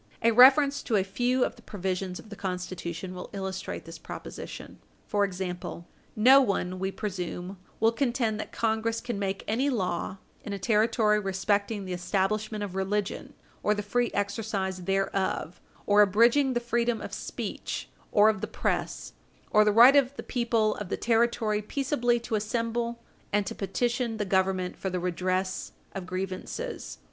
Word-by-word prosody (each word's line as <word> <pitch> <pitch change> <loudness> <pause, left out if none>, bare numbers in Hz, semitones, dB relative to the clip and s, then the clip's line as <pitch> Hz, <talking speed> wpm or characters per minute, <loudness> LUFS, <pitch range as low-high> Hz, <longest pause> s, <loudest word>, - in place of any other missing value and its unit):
A 230 - +5
reference 275 +4 +7
to 230 - -1
a 195 - +3
few 245 +6 +1
of - - -5
the - - -15
provisions 190 -3 -3
of 220 - -12
the 210 - -8
Constitution 180 -1 -4
will 180 - -7
illustrate 190 -4 -4
this 165 0 -9
proposition. - - -8 0.3
For 205 -1 +1
example, 180 -2 -4 0.3
no 260 +6 +7
one, 185 -6 -1
we 190 +1 -1
presume, 185 -2 -5 0.2
will 225 +1 +4
contend 235 -3 0
that - - -5
Congress 225 0 0
can 240 -4 -4
make 195 -1 -2
any 250 +7 +1
law 185 -5 -2 0.3
in 205 - -5
a - - -2
Territory 215 +1 +3
respecting 200 +1 0
the 185 - -4
establishment 205 +4 -1
of 195 -3 -5
religion, 195 +1 -2 0.3
or 210 - +2
the 205 - -3
free 240 +4 +1
exercise 200 -3 -2
thereof, 195 -3 -1 0.2
or 205 0 +6
abridging 235 +7 +4
the 240 - +1
freedom 235 -1 0
of - - -7
speech - - -5 0.2
or 210 +1 +6
of 215 -3 +2
the - - -2
press, - - -2 0.4
or 215 - +6
the 210 - +3
right 240 +6 +8
of 275 -1 +3
the - - -6
people 230 -3 +1
of 205 -3 -6
the - - -1
Territory 225 -2 +1
peaceably 245 0 0
to 230 - -6
assemble 230 +2 -1 0.3
and 205 0 +2
to - - -4
petition 235 +4 -1
the 210 - -1
Government 190 -1 +1
for 190 - -3
the 180 0 -2
redress 185 +1 -1 0.2
of 190 -2 -6
grievances. 190 - -5
210 Hz, 165 wpm, -28 LUFS, 190-235 Hz, 0.4 s, right